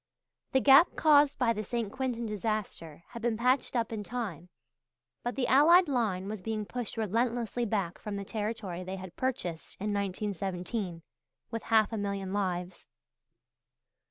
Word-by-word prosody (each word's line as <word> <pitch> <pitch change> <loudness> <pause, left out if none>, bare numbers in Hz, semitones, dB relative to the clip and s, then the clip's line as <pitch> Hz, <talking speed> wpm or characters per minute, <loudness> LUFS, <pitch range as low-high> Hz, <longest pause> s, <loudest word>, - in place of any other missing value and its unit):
The 265 - +5
gap 280 +6 +7
caused 290 -2 +5
by 240 -3 +2
the 215 -1 -3
St. 225 0 -3
Quentin 245 -2 -2
disaster 210 -7 -4
had 235 - -8
been 230 -1 0
patched 255 +3 +1
up 230 -1 0
in 210 -2 -3
time, 200 -8 -5 0.7
but 240 - -3
the 265 - 0
Allied 335 +7 +6
line 215 -9 0
was 210 -1 -5
being 215 +1 -3
pushed 240 +1 -5
relentlessly 235 +2 0
back 195 -5 -2
from 210 -2 -5
the 200 0 -4
territory 210 -4 -4
they 185 +1 -5
had 185 -2 -9
purchased 185 -11 -3
in 205 +1 -1
1917 195 -2 -3 0.5
with 230 -1 -3
half 220 -1 +3
a - - -1
million 200 -2 -3
lives. 180 -3 -3
215 Hz, 155 wpm, -30 LUFS, 195-240 Hz, 0.7 s, gap